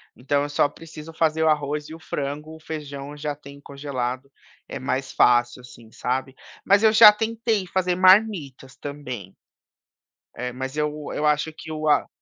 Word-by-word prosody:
Então 140 +3 0
eu 145 - -4
só 145 0 +2
preciso 160 0 -11
fazer 160 0 +1
o 160 - +4
arroz 150 0 -1
e 160 - -8
o - - -13
frango, 150 +1 -5
o 160 - -14
feijão 145 -2 -7
já 150 0 -3
tem 140 -1 -13
congelado, 140 -2 -5 0.4
é - - -6
mais 130 0 -2
fácil, 120 0 +3
assim, 120 -2 -15
sabe? 130 +3 -3 0.3
Mas 200 +2 +4
eu 220 - +6
já 215 -1 +10
tentei 220 -1 -1
fazer 180 -1 0
marmitas 185 - +3
também, 130 -10 -7 1.0
eh, 125 0 -4
mas 130 +2 -5
eu 150 0 -2
eu 150 - -2
acho 150 +1 +1
que 160 0 -10
o 155 0 -3
a 145 -2 +3
150 Hz, 170 wpm, -23 LUFS, 135-160 Hz, 1.0 s, já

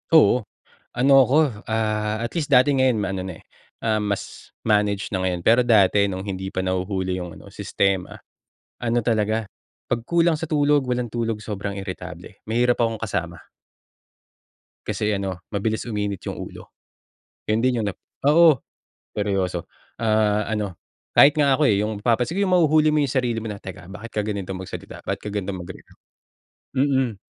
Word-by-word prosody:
Oo. 150 -5 +6 0.6
Ano 135 +1 +7
ako, 130 -5 +2
ah, 110 -1 0
at 115 +5 -4
least 155 -4 -2
dati 135 +1 +5
ngayon 130 -4 +3
ma-ano 95 -2 -2
na 95 -3 -7
eh, - - -21 0.4
um, 110 -1 +2
mas 100 - -5 0.2
manage 105 -2 +1
na 95 - 0
ngayon. 90 -2 -2
Pero 120 +2 +6
dati 100 -3 +4
no'ng 95 +1 -5
hindi 95 -1 -4
pa 95 - -6
nahuhuli 95 0 -1
'yong 85 -2 -8
ano - - -14
sistema, 95 -2 -1 0.6
ano 120 0 +1
talaga 110 -1 +1 0.4
'pag 120 -1 -1
kulang 170 +5 +2
sa 160 0 -5
tulog, 145 -2 +3
walang 125 -1 0
tulog 115 -2 -1
sobrang 100 -2 -5
iritable. 90 0 -8
Mahirap 120 +2 +2
akong 115 -1 0
kasama. 85 -6 -3 1.5
Kasi 105 0 -1
ano 95 -3 -3
mabilis 110 +1 -1
uminit 105 -4 -3
'yong - - -5
ulo. - - -9 0.7
'Yon 110 +2 +1
din 125 -1 +2
'yong 105 - -1
'no 100 - -2 0.3
oo, 155 -1 +6 0.6
seryoso 95 -4 -1 0.3
ah, 110 -1 +2
ano 105 -4 -2 0.4
kahit 145 +2 +7
nga 140 -2 +4
ako 150 -3 +3
eh, 100 - +3
'yong 105 0 -2
napapansin 125 - +1
'yong 195 - +2
mahuhuli 155 -3 +4
mo 150 - +2
'yong 140 -3 0
sarili 125 -4 0
mo 115 - -8
na, 105 -2 -6
"Teka, 90 -2 -9
bakit 115 +3 -8
ka 105 - -1
ganito 100 -3 -3
magsalita? 95 - -8
Bakit - - -2
ka 105 - -5
ganitong 100 -3 -3
magreact?" 85 +1 -12 0.8
Mm, 130 -4 +1
110 Hz, 165 wpm, -23 LUFS, 100-125 Hz, 1.5 s, Ano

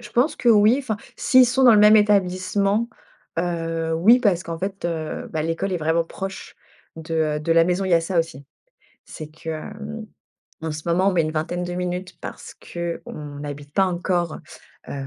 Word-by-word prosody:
Je - - -12
pense 250 +6 +1
que 240 - 0
oui. 215 +2 +6
Enfin, 255 -7 -3 0.2
s'ils 255 -1 +5
sont 260 +2 +2
dans 245 - +8
le 210 - +6
même 210 +1 +8
établissement, 200 +2 +2 0.5
heu, 165 -1 -2
oui, 225 +10 +5
parce 190 -7 +2
qu'en 165 -2 -6
fait, 195 0 -5
heu, 160 -2 -3
bah, 155 - -1
l'école 165 +4 -2
est - - +1
vraiment 165 +1 +1
proche 195 +3 -7 0.4
de, 160 0 -6 0.2
heu, - - -4
de 165 +2 +1
la 165 0 +5
maison. 180 +2 0
Il 190 - -2
y 170 - +6
a 165 - +4
ça 170 +2 -1
aussi. 155 -4 -2 0.6
C'est 155 - -9
que, 160 +1 -8
hem, 215 +7 -7 0.6
en 160 -1 -3
ce 150 0 -6
moment, 185 +3 +3
on - - 0
met 175 -2 +2
une 155 0 -2
vingtaine 165 +3 -2
de 175 0 -4
minutes 180 +1 -4
parce - - -9
qu'on 155 -4 -7
habite 145 0 -8
pas 195 - +3
encore, 175 -2 -1 0.5
heu, - - -5
175 Hz, 200 wpm, -22 LUFS, 165-200 Hz, 0.6 s, dans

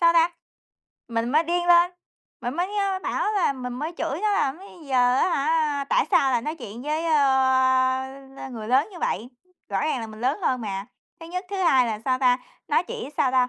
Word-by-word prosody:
Sao 335 -1 +6
ta? 335 +1 +4 0.8
Mình 230 0 -1
mới 310 +3 +4
điên 350 +1 -1
lên, 345 0 +6 0.5
mình 245 +2 -3
mới, 380 +4 -2
a, 395 -2 0
bảo 420 - -1
là 385 -9 +2
mình 250 -2 -6
mới 300 +7 -4
chửi 290 +7 -2
nó 425 -1 +2
là 275 -9 +1
"Bây 360 -4 -14
giờ 250 -1 +3
á 365 - +3
hả, 295 -2 +1
tại - - +2
sao 270 - +4
lại 240 -2 +1
nói 305 +3 -3
chuyện 235 -3 -9
với, 305 +3 -2
ơ, 260 -3 +3 0.4
người 220 -3 -7
lớn 265 - +3
như 350 - -9
vậy?" 225 +6 -2 0.4
Rõ - - -1
ràng 305 -5 0
là 225 - -5
mình 215 0 -11
lớn 260 +7 0
hơn 255 -5 +1
mà, 195 -2 -4 0.3
thứ 330 - -9
nhất. 365 +2 -4
Thứ 400 - -3
hai 270 -9 +4
là, 220 -2 -2
sao 255 -1 +1
ta, 250 -1 +3 0.3
nó - - +3
chỉ, 275 - -6
sao 265 - +2
ta, 250 -1 +3
275 Hz, 220 wpm, -24 LUFS, 250-335 Hz, 0.8 s, Sao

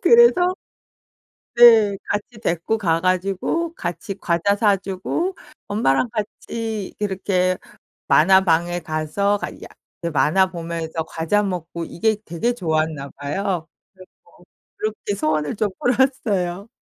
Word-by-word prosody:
그래서 370 -7 +5 1.0
네 225 -4 +7
같이 210 +2 -4
데리고 170 +6 0
가 165 -5 +1
가지고 190 - 0
같이 175 +3 -5
과자 175 +4 +1
사 205 -2 +3
주고 195 - -3 0.3
엄마랑 205 - +1
같이 220 -1 -4
이렇게 190 -2 0 0.5
만화방에 175 0 +4
가서 160 +7 -1
가야 - - -6 0.5
그 170 - -1
만화 155 +5 +3
보면서 165 -2 -4
과자 165 +7 0
먹고 170 -3 -4
이게 220 +6 0
되게 175 +9 -1
좋았나 155 -6 -1
봐요. 165 +4 -3 0.3
그래서 185 -1 -15 0.7
그렇게 215 -1 -3
소원을 155 -4 -1
좀 215 -1 +1
풀었어요. 225 -7 0
190 Hz, 245 characters per minute, -21 LUFS, 165-215 Hz, 1.0 s, 네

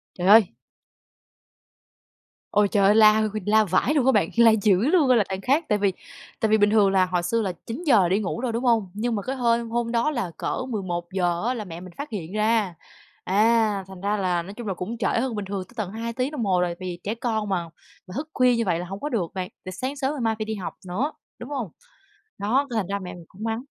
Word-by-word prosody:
Trời 180 - -3
ơi! 215 -2 +8 2.0
Ôi, 205 -1 +4
trời 200 -1 +2
ơi! 205 - +6
La 215 0 +6
h 215 - +2 0.2
la 215 +1 +4
vãi 200 - +1
luôn 270 -4 +2
á 265 - +5
bạn, 205 -8 +2
la 230 -1 +7
dữ 205 -4 +3
luôn 310 -7 +4
á 250 - +6
là 210 - +3
đằng 190 0 -3
khác. 280 +10 +1
Tại 210 - +2
vì 200 -2 +2 0.5
tại 220 - +2
vì 220 0 +4
bình 205 0 +4
thường 210 -3 +4
là 190 -1 +3
hồi 180 -1 -1
xưa 225 +6 0
là 190 -3 -2
9:00 230 - +2
đi 190 +3 +2
ngủ 210 +3 -3
rồi, 245 -2 -2
đúng 235 +3 -2
hông? 225 -6 +2
Nhưng 230 +3 -1
mà 205 - -2
cái 260 +6 -4
hôm 235 -2 +1
hôm 235 0 -1
đó 235 +6 +2
là 235 - -2
cỡ - - -2
11:00 175 -4 -2
á 255 - 0
là 220 -4 -5
mẹ 170 -3 -8
mình 185 -1 -11
phát 285 -1 -5
hiện 185 -5 -6
ra. 215 -3 +1 0.5
À! 210 0 +2
Thành 190 -1 -11
ra 205 +2 0
là 180 -3 0
nói 195 +4 -9
chung 240 -3 -7
là 195 - -2
cũng 210 +7 -5
trễ 205 - 0
hơn 240 0 0
bình 205 - -3
thường 195 -1 -4
tới 245 - -21
tận 210 -5 -3
2 230 +1 -4
tiếng 255 +4 -2
đồng 265 -7 -2
hồ 185 -3 +2
rồi, 175 -1 0
vì 180 -2 -5
trẻ 210 - -2
con 225 -3 -2
mà 185 -3 -1 0.4
mà 185 - -11
thức 295 +6 -4
khuya 250 -1 +4
như 230 - +1
vậy 170 -2 +1
là 175 - -5
hổng 195 +3 -7
có 295 - -2
được 195 - -2
bạn. 185 -1 -3 0.2
Tại 185 - -6
sáng 260 +9 -4
sớm 270 0 -1
ngày 285 - -5
mai 225 -1 +1
phải 215 - -2
đi 220 0 -3
học 195 -4 -6
nữa, 255 - -1 0.3
đúng 240 - -8
hông? 250 - -3 0.7
Đó, 250 +8 +1
cái 235 - -3
thành 195 - -1
ra 200 +1 -2
mẹ 185 -2 -7
mình 175 -1 -12
cũng 205 +4 -10
mắng. 225 +1 -2
215 Hz, 260 wpm, -24 LUFS, 190-235 Hz, 2.0 s, ơi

